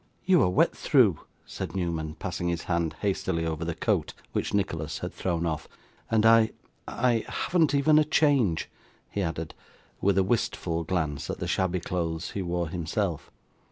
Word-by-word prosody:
'You 185 -3 +5
are 90 - +4
wet 90 - +3
through,' - - +4 0.3
said - - -6
Newman, 80 -4 -2
passing 90 -2 -3
his 85 -1 -1
hand 85 -2 -1
hastily 95 -4 0
over 80 0 -2
the 85 -1 -3
coat - - 0 0.2
which - - -1
Nicholas 80 -6 -1
had - - -5
thrown 85 -2 -1
off; 80 -2 -2 0.4
'and 110 -1 +3
I 115 0 +6 0.3
I 120 -3 +1
haven't 160 -5 +1
even 150 +2 +5
a - - +5
change,' 140 - +2 0.4
he 100 - -2
added, 80 -3 -3 0.5
with 100 -1 +2
a 95 - +5
wistful 90 -5 -1
glance 80 -5 -2
at - - -3
the - - -4
shabby 90 -1 0
clothes 85 -1 -3
he 100 - -3
wore 85 -2 -2
himself. 85 +1 -2
90 Hz, 165 wpm, -27 LUFS, 80-105 Hz, 0.5 s, I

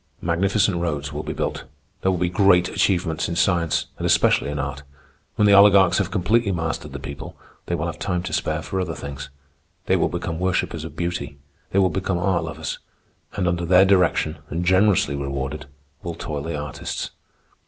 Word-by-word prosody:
Magnificent 95 +3 +1
roads 75 -4 -2
will - - -3
be - - -5
built. - - -3 0.4
There 95 - +2
will 95 - +1
be 90 +1 +1
great 90 -1 +4
achievements 85 -5 0
in 85 - -2
science, 85 -3 +1
and - - -2
especially - - +3
in 75 - -3
art. 70 0 -4 0.5
When 105 - +3
the 100 - +6
oligarchs 100 -2 +6
have 95 -3 0
completely 100 +3 +1
mastered 80 -2 -3
the - - -4
people, 80 +4 -8 0.3
they 85 - 0
will 80 -1 -2
have 85 -3 -5
time 90 -3 -1
to 95 - -5
spare 80 +1 -1
for 95 +4 -2
other 85 -3 -3
things. 70 -1 -7 0.6
They - - +3
will - - +2
become 85 -1 -4
worshippers 90 -3 -1
of 80 - -9
beauty. 85 -5 -3 0.3
They - - -2
will 95 -1 +4
become 95 -1 -1
art 90 -1 +1
lovers. 80 - -5 0.5
And 95 -3 -1
under 85 0 0
their 90 +2 +6
direction 90 -5 +2
and 85 +3 -2
generously 95 -5 +3
rewarded, 70 +1 -4 0.3
will 85 -2 -5
toil 75 -3 -4
the 80 0 -4
artists. 75 -1 -5
85 Hz, 185 wpm, -23 LUFS, 80-95 Hz, 0.6 s, the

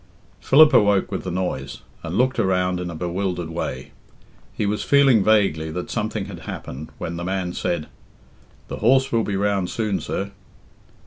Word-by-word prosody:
Philip 155 +3 +6
awoke 100 -2 +4
with - - -4
the - - -2
noise, 90 -7 -3 0.2
and 85 +4 -4
looked 130 +1 +2
around 90 -1 +1
in 90 0 -4
a 85 - -6
bewildered 90 0 -3
way. 65 -6 -4 0.6
He - - -2
was 105 +1 -1
feeling 135 -7 +5
vaguely 95 -7 +2
that 90 +3 -5
something - - -2
had - - -8
happened, 75 +4 -7
when 85 0 -5
the 85 - -4
man 95 -1 -2
said 85 -4 -2 0.8
"The - - -5
horse 130 +4 +3
will 115 -1 +2
be 100 - -2
round 100 -2 0
soon, 105 -4 -1
sir." 100 0 -4
95 Hz, 170 wpm, -22 LUFS, 85-105 Hz, 0.8 s, Philip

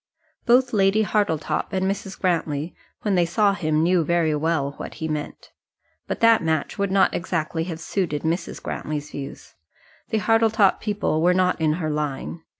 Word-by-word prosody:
Both 245 +1 +4
Lady 200 +1 +3
Hartletop 205 -7 -1
and 190 0 0
Mrs. 195 0 -3
Grantly, 165 -3 -1 0.3
when 210 - +1
they 180 -2 +4
saw 200 +4 +2
him, 155 -4 0
knew 175 0 +3
very 165 -1 +1
well 150 -2 0
what - - -7
he 160 - -4
meant. 150 -1 -5 0.6
But - - -4
that 230 -1 +6
match 160 +3 -1
would 200 -1 +1
not 190 0 +3
exactly 165 -2 -2
have 165 -3 -5
suited 165 -3 -2
Mrs. 170 +2 -2
Grantly's 150 -1 -4
views. 135 -1 -8 0.6
The 220 - 0
Hartletop 225 -2 +3
people 205 -7 -1
were 180 +2 +4
not 180 -2 +1
in 155 -1 +3
her 155 -2 -2
line. 150 +2 -3
175 Hz, 165 wpm, -23 LUFS, 155-200 Hz, 0.6 s, that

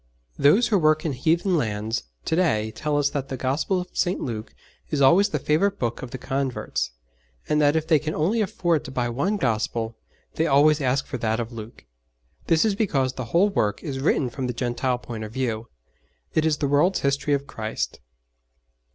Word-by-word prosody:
Those 215 +11 +5
who 205 -4 +3
work 155 0 +3
in 155 - 0
heathen 165 +7 +1
lands 110 - -2 0.2
to - - +1
day 110 -12 +1
tell 150 +4 -1
us 145 -1 +2
that 135 -2 -3
the 130 - -4
Gospel 145 +9 0
of 180 - -9
St. 180 +2 +1
Luke 110 - -5 0.3
is 150 - -1
always 175 +10 +5
the 155 - -1
favourite 165 +8 +1
book 120 -1 -2
of 130 - -6
the 130 - -6
converts, 130 - -2 0.6
and 150 0 +2
that 145 +1 +4
if 160 -1 +1
they 155 - +5
can 155 +1 -4
only 195 +9 +1
afford 175 -6 0
to - - -6
buy 125 -2 -1
one 170 - 0
Gospel 115 - -1 0.4
they 160 - 0
always 150 +2 +4
ask 130 0 +1
for 130 - -5
that 110 0 0
of 115 0 -4
Luke. 115 0 -10 0.6
This 165 +4 +4
is 215 - +2
because 140 - 0
the 130 - -5
whole 175 - +3
work 105 - -1
is 135 -4 -4
written 135 -2 +1
from 130 +1 -3
the 125 - -2
Gentile 125 +1 -1
point 115 -2 -7
of 105 - -7
view 115 -4 -2 0.7
it 155 0 +2
is 155 -2 +1
the 145 - 0
world's 150 +7 +3
history 140 +1 +1
of 140 0 -4
Christ. 110 -5 -4
140 Hz, 200 wpm, -24 LUFS, 120-160 Hz, 0.7 s, Those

